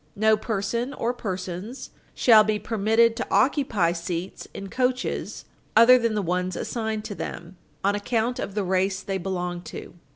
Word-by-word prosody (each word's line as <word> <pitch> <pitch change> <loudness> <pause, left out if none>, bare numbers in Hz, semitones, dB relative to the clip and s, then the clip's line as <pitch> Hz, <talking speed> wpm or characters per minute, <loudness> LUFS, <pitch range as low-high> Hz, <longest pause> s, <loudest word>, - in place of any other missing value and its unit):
No 220 +1 +4
person 230 +5 -2
or 235 +2 -1
persons, 190 +2 -5 0.2
shall 220 -3 +7
be 215 0 0
admitted 225 +2 +2
to 250 - -3
occupy 250 - +2
seats 170 +1 -5
in 195 - -7
coaches 255 +3 -2 0.3
other 250 +3 +8
than 230 -2 0
the 210 - 0
ones 180 +1 -1
assigned 220 -2 -3
to 205 - -5
them 175 -2 -7 0.3
on 200 +1 +3
account 225 +3 -1
of 200 - -4
the 210 - 0
race 190 +1 0
they 195 -1 -2
belong 180 -1 -3
to." - - -8
210 Hz, 160 wpm, -25 LUFS, 185-230 Hz, 0.3 s, other